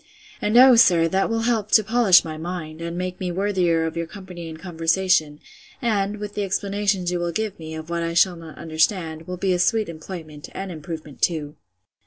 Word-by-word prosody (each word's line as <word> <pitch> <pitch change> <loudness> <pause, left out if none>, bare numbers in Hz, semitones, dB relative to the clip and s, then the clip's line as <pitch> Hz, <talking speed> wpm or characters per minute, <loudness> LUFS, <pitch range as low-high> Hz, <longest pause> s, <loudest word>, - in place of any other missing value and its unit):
And, 210 +3 +2
O 255 0 +9
sir! 175 -8 +5
that 190 +3 +1
will 225 0 0
help 225 -3 0
to 215 - +7
polish 220 -5 +5
my 160 -1 -5
mind, 160 -1 -6
and 170 +1 -4
make 180 0 -4
me 180 -2 -2
worthier 180 -3 +1
of 160 - -4
your 170 0 -3
company 180 -2 -9
and 160 - -8
conversation; 165 -2 +1 0.4
and, 210 -5 0
with 205 0 -6
the 205 - -3
explanations 195 -1 -1
you 175 - -1
will 175 0 -1
give 210 +1 -3
me, 160 0 -7
of 160 +1 -8
what 170 0 -1
I 165 0 -2
shall 180 +1 +4
not 165 -2 -11
understand, 160 0 -1
will 180 0 -5
be 185 +1 +1
a 180 - 0
sweet 215 +1 +2
employment, 155 -2 -9
and 190 -1 -5
improvement 155 -3 -8
too. 155 -3 0
175 Hz, 205 wpm, -23 LUFS, 165-200 Hz, 0.4 s, O